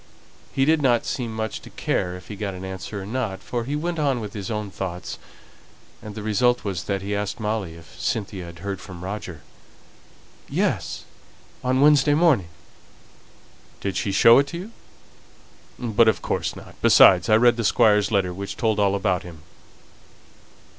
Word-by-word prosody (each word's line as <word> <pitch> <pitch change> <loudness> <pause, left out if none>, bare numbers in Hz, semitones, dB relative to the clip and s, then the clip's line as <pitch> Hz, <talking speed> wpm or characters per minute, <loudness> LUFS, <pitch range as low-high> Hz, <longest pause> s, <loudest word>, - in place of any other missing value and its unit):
He 135 - +1
did 160 +1 +3
not 120 -4 +2
seem 120 -3 -3
much 110 -1 -3
to - - -12
care 90 -1 -2
whether 90 0 -10
he 105 - -8
got 100 -2 -4
an 90 +1 -7
answer 95 +2 -6
or - - -8
not, 110 -3 -3
for 120 -1 -3
he 140 +3 -2
went 170 +2 -2
on 140 -4 +1
with 105 -2 -6
his 100 -3 -5
own 105 -3 -3
thoughts, 90 -1 -5 0.8
and 105 -1 -9
the 110 - -6
result 120 +3 +2
was 90 -4 -3
that 100 0 -2
he 100 +1 -2
asked 105 +4 -3
Molly 105 -6 -2
if 85 -1 -15
Cynthia 100 -4 -2
had 85 -1 -11
heard 100 -1 -4
from 90 -2 -10
Roger. 95 -5 -6 1.1
"Yes; - - -1 0.6
on 130 +1 +1
Wednesday 145 0 +5
morning." 150 - +3 1.3
"Did 100 -1 -3
she 100 - -1
show 115 +5 +7
it 140 - +1
to 170 - -6
you? 190 +6 -8 1.1
But 115 -1 +2
of 105 -6 +2
course - - -2
not. - - -12
Besides, 90 -3 +6
I 110 - +6
read 120 +1 +5
the 115 - -1
Squire's 105 -2 +4
letter, 95 -4 +1
which 100 +2 -6
told 110 -3 +1
all 100 -1 +3
about 95 -3 0
him." 80 -4 -12
105 Hz, 175 wpm, -23 LUFS, 95-120 Hz, 1.3 s, show